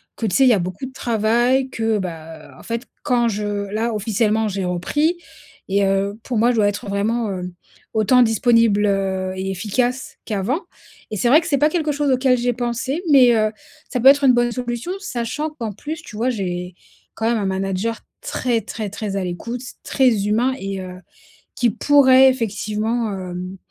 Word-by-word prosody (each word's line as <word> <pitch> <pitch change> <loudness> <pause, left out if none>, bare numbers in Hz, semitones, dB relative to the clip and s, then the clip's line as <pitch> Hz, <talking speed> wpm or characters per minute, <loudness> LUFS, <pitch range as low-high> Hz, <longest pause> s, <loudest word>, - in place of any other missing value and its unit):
que 230 - -3
tu 185 -4 0
sais, 270 - +5
il 260 - +6
y - - +6
a 205 - +2
beaucoup 185 +8 -4
de 260 - -8
travail 240 +3 +1
que, 225 -3 0
bah, 165 -4 -7
heu, - - -16
en - - -14
fait, 230 +1 -4 0.2
quand 240 -1 +2
je 205 -2 -2
là 225 +2 -1
officiellement, 215 +1 0
j'ai 195 -2 -3
repris 295 - 0 0.5
et 200 +1 +1
heu, 195 +2 0
pour 245 - -3
moi, 235 +3 +4
je - - -1
dois 210 -2 +4
être 205 0 -3
vraiment, 215 +3 0
heu, 180 -1 -5 0.4
autant 220 +4 +4
disponible, 225 -2 +3
heu 190 -2 -1
et 190 +1 -3
efficace 240 +7 -2
qu'avant 215 - -1 0.5
et 215 - -3
c'est 235 - +1
vrai 295 +5 +7
que 335 - -7
c'est 290 -4 +2
pas 300 +2 +3
quelque 310 -2 0
chose 285 -1 0
auquel 255 0 +3
j'ai 245 0 0
pensé, 250 +5 -2
mais, 255 -4 +7
heu, 215 -1 +2 0.4
ça 250 - -2
peut 250 - +4
être 280 0 +5
une 255 - +6
bonne 240 0 +2
solution 240 +5 -4
sachant 300 - -3
qu'en 235 -8 -5
plus 300 - -6
tu 215 - -11
vois, 240 +4 +1
j'ai 180 -5 -4 0.4
quand 225 - -1
même 235 0 +2
un 200 - -2
manager 195 +3 -2 0.2
très 255 - -1
très 215 -2 -5
très 205 0 -5
à 195 - -1
l'écoute, 230 +7 -5 0.2
très 240 -7 +2
humain 235 +5 +2
et 195 0 -4
heu, 185 0 -8 0.6
qui 240 -2 +2
pourrait 265 +2 +5
effectivement, 220 -1 -1
hem, 185 0 -6
225 Hz, 195 wpm, -20 LUFS, 195-250 Hz, 0.6 s, vrai